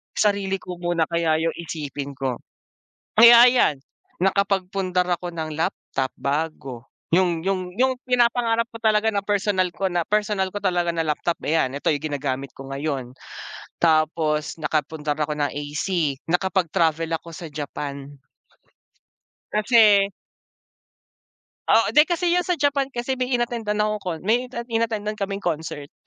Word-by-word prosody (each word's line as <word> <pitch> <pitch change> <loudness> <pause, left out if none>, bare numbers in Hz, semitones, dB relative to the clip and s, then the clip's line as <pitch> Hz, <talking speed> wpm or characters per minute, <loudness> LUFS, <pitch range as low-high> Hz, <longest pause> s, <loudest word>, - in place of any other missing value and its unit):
Sarili 200 -2 +1
ko 180 -1 -7
muna 175 -2 0
kaya 170 -2 +1
yung 165 - -1
isipin 145 -4 -6
ko. 130 -2 -3 0.8
Kaya 235 +1 +10
ayan, 245 - +3 0.5
nakapagpundar 190 -1 +1
ako 175 -1 -7
ng 160 -1 -4
laptop, 135 -4 -2
bago 140 -3 -3 0.2
yung 175 -1 +2
yung 185 +1 -2
yung 260 0 +3
pinapangarap 235 -2 +2
ko 230 0 -12
talaga 215 0 +3
na 205 -2 0
personal 200 -3 +1
ko 190 +4 -2
na 175 -2 0
personal 210 -2 0
ko 205 - -4
talaga 175 -3 0
na 165 -1 -2
laptop 160 +3 -1
ayan, 155 -4 +2
ito 140 +2 -5
yung 145 -1 +1
ginagamit 135 -1 -3
ko 135 +2 -11
ngayon. 135 -3 -4 0.7
Tapos 155 -1 +1
nakapundar 150 -1 -2
ako 150 0 -1
ng 145 - +2
AC, 145 +1 -2
nakapag-travel 170 -3 +1
ako 170 - -13
sa 165 0 -8
Japan. 140 -1 -6 1.4
Kasi 210 -2 +5 1.6
Oo 225 - +4
di, 300 +2 +6
kasi 345 0 0
yun 360 +1 +1
sa 360 - +2
Japan 280 -2 +1
kasi 260 0 -3
may 255 - 0
inattendan 230 -3 -1
akong 215 0 -1
con 175 -4 -4
may 240 +5 +1 0.2
inattendan 220 -2 -1
kaming 200 0 -3
concert 155 -3 -4
180 Hz, 140 wpm, -23 LUFS, 155-210 Hz, 1.6 s, Kaya